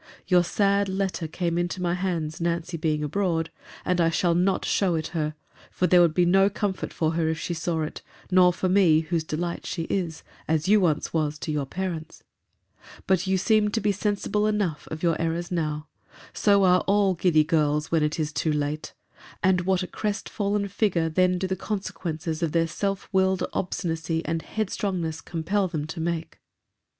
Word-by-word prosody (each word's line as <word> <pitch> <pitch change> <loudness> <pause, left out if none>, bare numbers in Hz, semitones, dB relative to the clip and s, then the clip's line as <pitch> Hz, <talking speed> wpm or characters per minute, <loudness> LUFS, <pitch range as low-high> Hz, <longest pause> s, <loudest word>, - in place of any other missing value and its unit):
Your 180 -1 +4
sad 200 +2 +1
letter 190 -3 -2
came 170 +1 -1
into 175 +1 -2
my 175 -1 0
hands, 170 -4 -2
Nancy 170 0 -1
being 155 -2 0
abroad: 165 0 -1 0.3
and 180 -1 +2
I 165 - +4
shall 170 +1 +2
not 185 +2 +1
show 185 -4 +1
it 160 -1 -2
her: 155 -2 -2 0.3
for 180 - 0
there 180 -1 +6
would 165 -3 +3
be 180 - +4
no 195 +3 +5
comfort 200 -1 -3
for 160 -1 0
her, 165 -1 0
if 160 - -1
she 175 - -3
saw 165 -1 -1
it, 155 - -6 0.3
nor 180 -1 +6
for 185 +1 -2
me, 180 -5 +5
whose 165 0 -1
delight 170 +2 -3
she 165 - -3
is—as 160 -2 -2
you 210 +1 +5
once 155 -4 0
was 155 -2 0
to 155 - -4
your 145 -3 -1
parents.— 175 -1 -5 0.8
But 190 0 +1
you 190 0 +2
seem 215 +2 +3
to 225 - -1
be 205 -1 +1
sensible 210 +1 0
enough 205 -8 -1
of 155 +1 -6
your 165 -2 +1
errors 165 +1 -2
now.—So 165 +5 -1
are 180 -1 +5
all 200 -1 +3
giddy 170 -3 +3
girls, 150 -1 +1
when 165 -1 +3
it 150 +2 0
is 150 -1 -1
too 155 - 0
late: 150 +1 -2 0.5
and 185 -1 +4
what 190 -1 +2
a - - -4
crest 210 0 -3
fallen 200 -1 -1
figure 185 -5 +1
then 180 +2 +2
do 190 - -2
the 190 0 -1
consequences 170 -5 -4
of 165 -3 -1
their 165 -1 +3
self 195 +4 -3
willed 190 -1 +2
obstinacy 165 -2 -2
and 165 0 -1
headstrongness 185 -6 -2
compel 185 +5 -1
them 155 -4 -3
to 160 +1 -7
make! 165 0 -3
175 Hz, 185 wpm, -25 LUFS, 160-190 Hz, 0.8 s, there